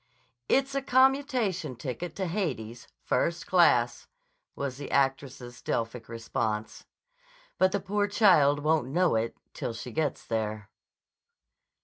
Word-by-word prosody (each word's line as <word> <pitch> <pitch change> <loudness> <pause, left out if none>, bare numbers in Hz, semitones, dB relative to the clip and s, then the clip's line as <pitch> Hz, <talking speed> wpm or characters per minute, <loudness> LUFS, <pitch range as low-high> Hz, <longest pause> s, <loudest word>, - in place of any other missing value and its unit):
"It's 270 +1 +2
a 275 - 0
commutation 255 - +2
ticket 135 +7 -5
to 190 - -2
Hades, 130 - -3 0.2
first 170 +1 0
class," 125 -10 +3 0.5
was 135 -2 -4
the 145 - -7
actress's 135 -3 -1
Delphic 115 0 -3
response. 110 -1 -3 0.7
"But 185 0 +4
the 200 0 -1
poor 205 +2 0
child 155 -9 +4
won't 155 -4 +2
know 175 +5 +2
it 110 +1 -1 0.2
till 115 - -4
she 120 +2 -7
gets 150 +3 -2
there." 110 -2 -3
145 Hz, 120 wpm, -28 LUFS, 120-190 Hz, 0.7 s, But